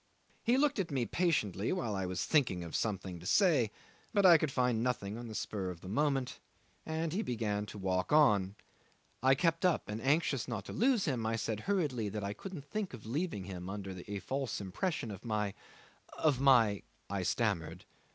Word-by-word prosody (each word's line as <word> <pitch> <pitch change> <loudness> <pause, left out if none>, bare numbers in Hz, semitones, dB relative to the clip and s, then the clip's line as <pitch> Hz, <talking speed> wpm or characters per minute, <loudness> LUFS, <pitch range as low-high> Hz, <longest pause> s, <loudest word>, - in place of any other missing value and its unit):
He 245 +2 +3
looked 280 -4 +2
at 185 - -1
me 130 -5 0
patiently 110 - 0
while 175 - -1
I 95 -1 -2
was 90 -1 -2
thinking 120 - +2
of 85 - -6
something 95 -5 -2
to 90 - -8
say, 155 - +4 0.5
but 200 -1 +4
I 170 -3 +9
could 150 -2 0
find 125 -3 +1
nothing 115 -5 -1
on 120 +1 -7
the 110 - -7
spur 100 -4 -3
of 85 -2 -8
the - - -10
moment, 135 +4 0 0.5
and 160 0 -2
he 200 - 0
began 105 - -2
to 105 - -8
walk 95 -1 -1
on. 105 -11 +4 0.7
I 130 +1 +5
kept 165 +3 +1
up, 180 -3 +2
and 105 +2 -4
anxious 140 -2 +1
not 115 -6 -4
to - - -7
lose 245 -3 +3
him, 130 -8 -1
I 115 - 0
said 110 -1 -2
hurriedly 140 - 0
that 105 0 -4
I 100 +1 -2
couldn't 165 - -8
think 200 -3 -3
of 110 - -13
leaving 140 - -2
him 90 -1 -6
under 100 -1 -5 0.2
a 105 0 -3
false 135 +4 -3
impression 110 - -2
of 100 - -9
my 105 -3 -1 0.6
of 145 -5 +2
my 115 -7 +5 0.3
I 100 0 -2
stammered. 100 -3 -1
115 Hz, 195 wpm, -33 LUFS, 100-155 Hz, 0.7 s, I